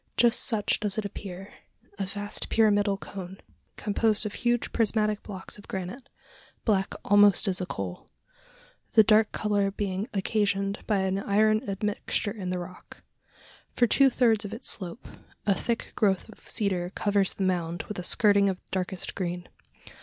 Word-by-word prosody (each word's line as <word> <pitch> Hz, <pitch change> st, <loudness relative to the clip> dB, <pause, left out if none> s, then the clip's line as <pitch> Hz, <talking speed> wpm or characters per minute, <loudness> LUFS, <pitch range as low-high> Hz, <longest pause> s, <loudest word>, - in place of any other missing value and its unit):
Just 240 Hz, -1 st, +4 dB
such 220 Hz, -5 st, +1 dB
does 210 Hz, -1 st, -1 dB
it 215 Hz, -, -1 dB
appear 195 Hz, -1 st, -7 dB, 0.5 s
a 195 Hz, -, -1 dB
vast 205 Hz, +1 st, -3 dB
pyramidal 205 Hz, -2 st, +3 dB
cone, 190 Hz, -1 st, -8 dB, 0.4 s
composed 215 Hz, +1 st, +1 dB
of 210 Hz, -, -3 dB
huge 240 Hz, -1 st, 0 dB
prismatic 215 Hz, -2 st, +2 dB
blocks 195 Hz, 0 st, -5 dB
of 205 Hz, -, -14 dB
granite, 190 Hz, +7 st, -6 dB, 0.6 s
black 195 Hz, -4 st, +1 dB
almost 205 Hz, -1 st, +6 dB
as 190 Hz, -1 st, 0 dB
a 180 Hz, -, -3 dB
coal 95 Hz, -, -6 dB, 0.8 s
the 220 Hz, -, +8 dB
dark 215 Hz, 0 st, +4 dB
colour 205 Hz, -2 st, +1 dB
being 195 Hz, 0 st, -3 dB
occasioned 200 Hz, 0 st, 0 dB
by 205 Hz, -3 st, +2 dB
an 190 Hz, 0 st, 0 dB
iron 215 Hz, +2 st, +3 dB
admixture 205 Hz, +1 st, -2 dB
in 195 Hz, -4 st, -5 dB
the 180 Hz, -, -1 dB
rock. 180 Hz, +1 st, -10 dB, 0.7 s
For 245 Hz, -, +4 dB
two 270 Hz, +3 st, +5 dB
thirds 230 Hz, -4 st, +2 dB
of 210 Hz, +2 st, -5 dB
its 245 Hz, -, -8 dB
slope, 185 Hz, +4 st, -5 dB, 0.4 s
a 200 Hz, -, +4 dB
thick 230 Hz, +4 st, -3 dB
growth 195 Hz, -3 st, +1 dB
of 220 Hz, -, -15 dB
cedar 185 Hz, -4 st, -1 dB
covers 200 Hz, 0 st, +1 dB
the 195 Hz, -, -2 dB
mound 175 Hz, -2 st, -1 dB
with 210 Hz, -, -6 dB
a -, -, -4 dB
skirting 200 Hz, +1 st, +4 dB
of 185 Hz, -1 st, -3 dB
darkest 185 Hz, -1 st, -3 dB
green. 175 Hz, -1 st, -4 dB
200 Hz, 160 wpm, -27 LUFS, 190-215 Hz, 0.8 s, the